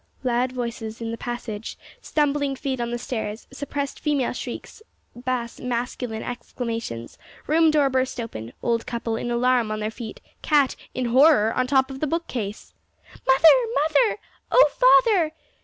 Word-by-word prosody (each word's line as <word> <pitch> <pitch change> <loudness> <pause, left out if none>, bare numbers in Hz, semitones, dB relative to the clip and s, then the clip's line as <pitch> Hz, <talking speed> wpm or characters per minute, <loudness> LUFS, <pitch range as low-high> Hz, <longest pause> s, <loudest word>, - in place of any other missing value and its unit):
Loud 250 0 +1
voices 235 -3 -5
in 230 -1 -4
the - - -3
passage; 230 -3 -5 0.2
stumbling 290 -2 0
feet 265 -2 -3
on 235 - -2
the 240 - -2
stairs; 220 -3 -4
suppressed 280 +1 -4
female 290 -5 0
shrieks; 255 - -7 0.3
bass 245 -1 -3
masculine 245 -2 -3
exclamations; 230 - -5 0.3
room 320 +2 +4
door 300 -2 +3
burst 260 -1 -1
open; 120 - -6
old 230 -1 0
couple, 230 -1 -2
in 240 - -3
alarm, 240 -1 +2
on 215 0 -2
their 215 +1 -2
feet; 225 -1 -8 0.2
cat, 290 -4 +3 0.2
in 255 - -1
horror, 250 -2 +5
on 255 0 0
the - - -11
top 265 -1 +3
of 265 - -7
the 305 - -1
bookcase! 250 -10 -4 0.5
"Mother! 265 +4 +4 0.3
mother! 315 +10 +3 0.3
O - - +7 0.4
father!" 355 -9 +2
250 Hz, 155 wpm, -24 LUFS, 230-280 Hz, 0.5 s, O